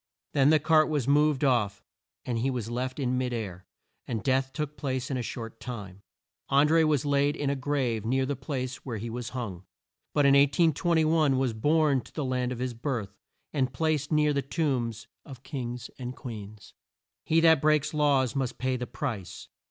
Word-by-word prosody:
Then 140 0 +4
the 155 - +6
cart 155 0 +4
was 145 -5 -1
moved 150 0 +3
off 105 -7 +1 0.4
and 120 -2 -1
he 130 +4 +1
was 120 -3 -3
left 130 +3 -3
in 130 -2 0
mid 125 -1 -1
air, 95 -6 -5 0.4
and 115 -3 -3
death 135 0 +1
took 150 0 -4
place 130 -1 -3
in 130 - 0
a - - -1
short 115 -1 -6
time. 100 -6 -7 0.5
An 140 +2 +5
dré 165 +1 +4
was 150 -3 +1
laid 145 0 +2
in 140 -1 -1
a - - 0
grave 130 -5 -1
near 130 +4 +1
the 140 +1 -2
place 130 -2 -4
where 120 -4 -6
he 115 +2 -5
was 120 0 -4
hung, 95 -7 -5 0.5
but 145 - +4
in 140 - +6
1821 155 +1 +3
was 130 -3 +1
borne 145 +3 +2
to - - -17
the 150 - -2
land 125 -1 -1
of 125 - -4
his 125 0 -3
birth, 115 -5 -4 0.4
and 135 -3 0
placed 155 +1 0
near 150 -1 +3
the 140 - +1
tombs 130 -6 -2 0.2
of 135 -4 -12
Kings 125 -4 -5
and 125 0 -5
Queens. 110 -3 -9 0.5
He 160 - +3
that 160 -3 +5
breaks 150 -1 +2
laws 140 -5 +2
must 130 -2 -2
pay 130 0 -1
the 125 0 -4
price. 110 -11 -5
130 Hz, 190 wpm, -28 LUFS, 120-145 Hz, 0.5 s, the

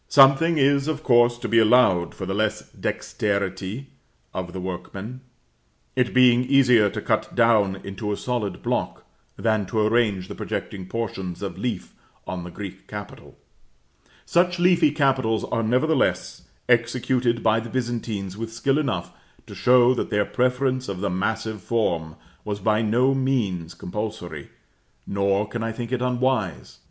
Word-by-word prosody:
Something 140 +4 +5
is, 140 0 +3
of 155 -1 -2
course, 120 -1 +4
to - - -5
be 115 - +4
allowed 105 -7 +4
for 95 - -5
the 95 - -3
less 110 +1 -1
dexterity 100 +4 -3 0.4
of 90 -1 -4
the 95 - -6
workmen; 95 +6 -6 0.7
it 125 -2 +1
being 125 -1 +5
easier 125 -6 +4
to - - -5
cut - - -1
down 110 -5 +3
into 100 +2 -4
a 105 - -2
solid 120 -5 -3
block, - - -2 0.3
than 110 -4 0
to 110 - -1
arrange 105 -5 +1
the - - -7
projecting 95 -2 -5
portions 95 -5 -4
of 95 -4 -5
leaf 115 -7 -4 0.3
on 90 -1 -5
the 90 - -7
Greek 95 +1 -9
capital: 105 -1 -9 0.9
such 180 +1 +2
leafy 175 -3 +4
capitals 130 -6 +1
are 115 - -1
nevertheless 130 +6 0 0.2
executed 120 0 +1
by 110 0 +3
the 115 +1 -7
Byzantines 115 -6 -3
with 115 +1 -5
skill 135 +6 0
enough 95 - -2 0.3
to - - -11
show 125 0 +5
that 125 - -3
their 105 0 +1
preference 130 0 0
of 95 -2 -5
the 100 -2 -1
massive 105 +3 -2
form 85 -8 -1 0.3
was 105 -1 -4
by 105 +2 +2
no 120 +5 +2
means 110 -11 -1
compulsory, 90 -6 -6 0.6
nor 100 +1 0
can 115 +2 -5
I 115 0 -2
think 115 +1 -6
it 130 -1 -1
unwise. 125 - -1
115 Hz, 150 wpm, -24 LUFS, 100-125 Hz, 0.9 s, Something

